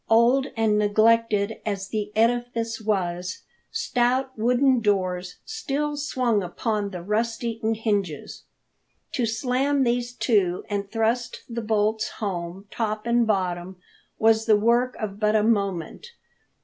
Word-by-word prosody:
Old 240 +4 +4
and 215 -2 +3
neglected 215 0 +2
as 200 -2 -3
the 210 -1 -3
edifice 230 0 0
was, 180 -4 -2 0.3
stout 260 - 0
wooden 250 +3 +3
doors 185 -3 0
still 295 -9 -2
swung 255 -7 0
upon 205 +3 -2
the 180 -3 -7
rust 225 +5 -1
eaten 225 -1 -1
hinges. 200 -9 -2 0.7
To 245 -4 0
slam 260 +5 +1
these 240 0 0
to 195 -9 +1
and 200 -1 -2
thrust 230 +2 -1
the 235 -1 -4
bolts 215 0 0
home, 185 -2 -4
top 215 -1 -2
and 235 -1 +2
bottom, 185 -3 -1 0.4
was 225 0 +3
the 215 -2 +6
work 235 +4 +2
of 205 -2 -5
but 215 0 +2
a 215 - +4
moment. 200 - -1
220 Hz, 130 wpm, -25 LUFS, 200-240 Hz, 0.7 s, the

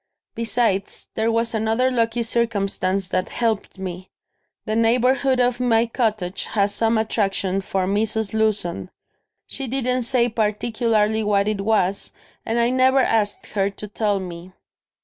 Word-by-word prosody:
Besides, 230 -4 -1
there 225 +1 0
was 230 0 0
another 225 +4 +1
lucky 235 -1 +1
circumstance 200 -5 0
that 185 0 -1
helped 225 -4 -2
me. 185 -1 -6 0.6
The 215 -2 -1
neighbourhood 250 +3 +2
of 245 0 +2
my 235 -2 +3
cottage 215 -6 -1
has 200 -1 0
some 225 +1 +2
attraction 195 -3 0
for 190 -1 -1
Mrs. 210 +2 -1
Lewson. 210 -5 0 0.6
She 270 -1 -6
didn't 255 0 0
say 240 0 +2
particularly 220 0 0
what 205 -1 +2
it 210 -2 -1
was 200 -2 0 0.3
and 225 - 0
I 235 +1 +2
never 260 +1 +4
asked 215 -4 0
her 195 -1 +1
to 205 +1 -8
tell 205 -1 0
me." 180 0 -8
220 Hz, 140 wpm, -22 LUFS, 200-235 Hz, 0.6 s, never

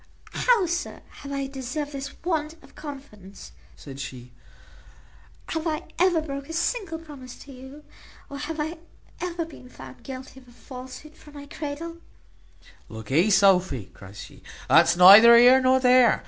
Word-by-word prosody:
"How, 470 -6 +2
sir, 345 +1 -4 0.2
have 280 - -9
I 275 -1 -3
deserved 270 +2 -6
this 275 -1 -8
want 315 -3 -2
of - - -19
confidence?" 265 -10 -11 0.2
said 135 -2 -12
she; 125 -2 -9 1.2
"have 320 +1 -3
I 310 +1 -3 0.2
ever 350 -2 +3
broke 280 -2 -7
a - - -6
single 345 0 -2
promise 285 -6 -12
to 280 - -14
you? 265 +3 -13 0.4
or 280 - -9
have 305 +2 -6
I 315 +2 -4 0.4
ever 345 -2 -4
been 275 -6 -15
found 130 - -13
guilty 265 0 -10
of 255 - -22
a - - -18
falsehood 260 +5 -12
from 295 -1 -17
my 285 0 -10
cradle?" 305 +3 -7 0.9
"Lookee, 130 - 0
Sophy," 185 - +2
cries 100 -1 -12
he; - - -15 0.3
"that's 170 - +4
neither 210 +6 +9
here 250 +2 +6
nor 260 0 +3
there. 250 -2 +4
275 Hz, 155 wpm, -24 LUFS, 235-315 Hz, 1.2 s, neither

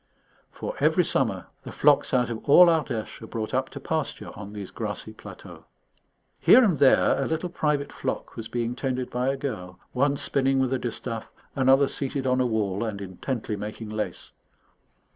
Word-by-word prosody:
For - - -5
every - - +3
summer, - - 0 0.2
the - - -9
flocks - - +3
out 125 -2 +2
of 115 - -5
all 180 +5 +9
Ardèche 145 -12 -1
are 110 - -8
brought 110 -1 -4
up - - 0
to - - -8
pasture - - -3
on 100 0 -9
these 100 -3 -7
grassy - - -5
plateaux. - - -12 0.7
Here 255 - +7
and 190 -9 +2
there 140 0 +4
a 135 - 0
little 160 +2 -2
private 150 -4 -1
flock - - -4
was 115 - -6
being 120 +1 -2
tended 130 -2 -3
by 125 +1 -1
a 135 - -1
girl, 90 -10 -5
one 140 +2 +1
spinning 135 -1 +1
with 130 -1 +1
a 130 - 0
distaff, 115 -1 -5 0.3
another 135 +1 +4
seated 135 -1 -3
on 130 0 +2
a 125 - +2
wall 105 -3 -1
and 110 -3 -3
intently 105 +4 -4
making 105 +2 -6
lace. 110 0 -4
125 Hz, 180 wpm, -26 LUFS, 110-140 Hz, 0.7 s, all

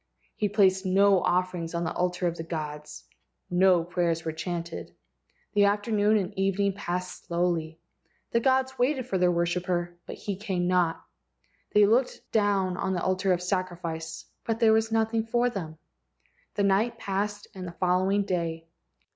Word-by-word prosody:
He 210 - 0
placed 190 -2 +3
no 195 0 +4
offerings 180 -2 -1
on 170 - -1
the 160 - -2
altar 180 0 -1
of 170 -1 0
the 165 - -5
gods. 150 - -6 0.5
No 180 -1 +4
prayers 170 -1 -1
were 160 - -1
chanted. 170 +1 -5 0.6
The 205 - +3
after¬ 205 +2 +2
noon 210 +1 +4
and 200 0 -2
evening 195 0 +1
passed 180 -1 -4
slowly. 170 -2 -1 0.5
The 235 - +3
gods 265 +1 +1
waited 260 0 +1
for 195 -7 -1
their 180 0 +4
worshipper, 175 0 -1
but - - -6
he 200 - -4
came 185 -3 -1
not. 180 -2 +1 0.7
They 210 0 +7
looked 240 +5 +1
down 200 -4 +1
on 190 - -1
the 175 - -2
altar 185 +1 +1
of 180 0 +1
sacrifice, 170 -3 -3 0.2
but 225 0 -2
there 225 -2 +5
was 220 0 +2
nothing 225 0 +1
for 240 +2 +1
them. 160 -7 -6 0.8
The 205 - +1
night 200 +4 +2
passed 205 +1 -3
and 185 -2 -7
the - - -6
following 185 +3 +2
day. 165 -4 -2
185 Hz, 165 wpm, -27 LUFS, 175-205 Hz, 0.8 s, They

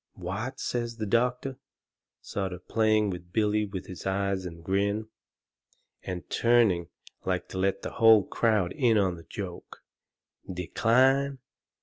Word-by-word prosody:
"What," 95 +8 -5
says 120 -1 -2
the 110 - -2
doctor, 125 +4 0 0.6
sort 95 -2 -3
of 90 0 -11
playing 110 -2 +2
with 90 -1 -8
Billy 105 +1 +1
with 95 -2 -6
his 90 +1 -7
eyes 95 -1 -1
and 85 -1 -10
grin, 100 +4 0 0.9
and 90 -1 -6
turning 115 -8 +3 0.4
like - - -1
to 95 - -5
let 95 +1 0
the - - -4
whole 115 -3 +6
crowd 105 -6 +1
in 120 -6 +3
on 95 -3 +2
the 85 -1 -12
joke, 95 -4 -8 0.7
"DECLINE? 130 +10 +2
105 Hz, 135 wpm, -28 LUFS, 95-115 Hz, 0.9 s, whole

